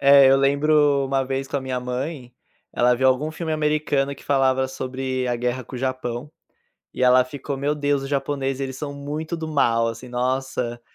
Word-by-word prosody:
É, 140 0 +7
eu 135 - +6
lembro 140 +1 +3
uma 135 0 +1
vez 135 +1 -3
com 140 - -3
a - - -1
minha 130 -1 -3
mãe, 125 +1 -5 0.4
ela 125 0 +3
viu 130 +2 +1
algum 130 +4 +2
filme 160 0 -4
americano 150 -2 0
que - - -16
falava 130 -1 +2
sobre 130 -1 -3
a 120 - 0
guerra 125 +1 -2
com 125 - -9
o - - -5
Japão 130 +1 -3 0.6
e 130 - 0
ela 125 0 +6
ficou: 140 +2 -5
"Meu 140 +2 0
Deus, 145 -1 0
os 135 - -5
japoneses, 135 -1 -2
eles 130 -1 -4
são 145 +1 -5
muito 150 +4 -4
do 160 -1 -5
mal, 115 -7 +2
assim, 115 +2 -5
nossa, 125 -1 -2
135 Hz, 195 wpm, -23 LUFS, 130-145 Hz, 0.6 s, É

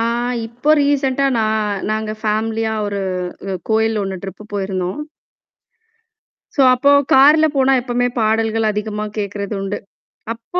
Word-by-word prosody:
ஆ - - +1 0.4
இப்போ 245 +6 -1
ரீசென்ட்டா 275 -1 +1
நான் 215 -2 -1
நாங்க 215 0 -2
ஃபேமிலியா 220 +1 -1
ஒரு 200 -1 -3 0.5
அ - - -2 0.2
கோயில் 220 0 +2
ஒண்ணு 195 -1 -3
டிரிப் 195 +2 -9
போயிருந்தோம். 190 -1 -2 1.6
சோ - - +2
அப்போ 280 +3 +3 0.2
கார்ல 300 +4 +6
போனா 270 0 +4
எப்பவுமே 245 0 0
பாடல்கள் 225 0 +1
அதிகமா 210 0 -3
கேட்கிறதுண்டு. 200 -1 -3 0.6
அப்போ 235 +10 -5
220 Hz, 120 wpm, -18 LUFS, 205-245 Hz, 1.6 s, கார்ல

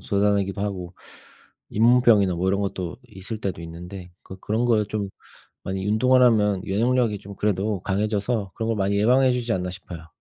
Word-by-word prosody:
돋아나기도 100 -2 +1
하고 95 -3 -4 0.8
잇몸병이나 115 -4 +4
뭐 90 +2 -1
이런 100 +1 +1
것도 95 -3 -3
있을 105 +1 -7
때도 90 -5 -4
있는데 90 +2 -9
그 95 - -11
그런 110 +3 -1
거를 110 -3 +3
좀 105 -1 -3 0.5
많이 95 0 -4
운동을 125 +5 +4
하면 105 -5 +3
면역력이 115 +1 +1
좀 100 0 -11
그래도 105 -1 -1
강해져서 105 +1 -1
그런 110 -1 -3
걸 115 - 0
많이 100 0 0
예방해 125 +5 +4
주지 120 -2 -1
않나 90 -3 -1
싶어요. 90 -2 -9
100 Hz, 375 characters per minute, -24 LUFS, 95-110 Hz, 0.8 s, 잇몸병이나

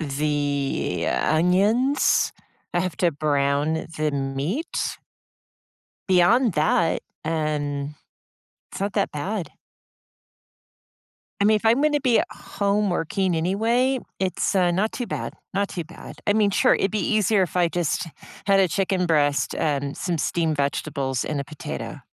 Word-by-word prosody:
the 145 -1 -1
onions. 200 - +2 0.4
I 175 - +3
have 185 -5 -3
to 175 -2 +3
brown 145 +1 0
the 155 0 0
meat 140 - -2 1.1
beyond 190 +5 +4
that, 160 +2 +2 0.2
um, 150 -2 -2 0.8
it's - - -7
not 200 +1 -2
that 200 -2 0
bad. 185 +5 -3 1.9
I - - +5
mean, 215 +1 +5
if 215 - -2
I'm 235 +5 +4
gonna 300 -1 +3
be 250 -4 +3
home 200 0 -1
working 175 +1 0
anyway, 230 +10 +1 0.2
it's, 190 +2 0
uh, 185 -2 +3
not 195 +5 +1
too 245 - -4
bad. - - -4 0.2
Not 200 0 +1
too 175 - -4
bad. 165 +2 -12
I 205 - +4
mean, 210 -1 +3
sure. - - +4
It'd 195 - 0
be 215 - 0
easier 210 +1 +2
if 180 -1 -1
I 175 -1 +4
just 170 -1 -1 0.4
had 195 -1 +4
a 190 - +4
chicken 185 +1 0
breast 145 -3 +2
and 140 -2 -1
some 175 -3 -2
steamed 160 0 0
vegetables 140 -2 -1
and 145 -2 -2
a - - -5
potato. 150 +2 -7
175 Hz, 140 wpm, -24 LUFS, 150-205 Hz, 1.9 s, I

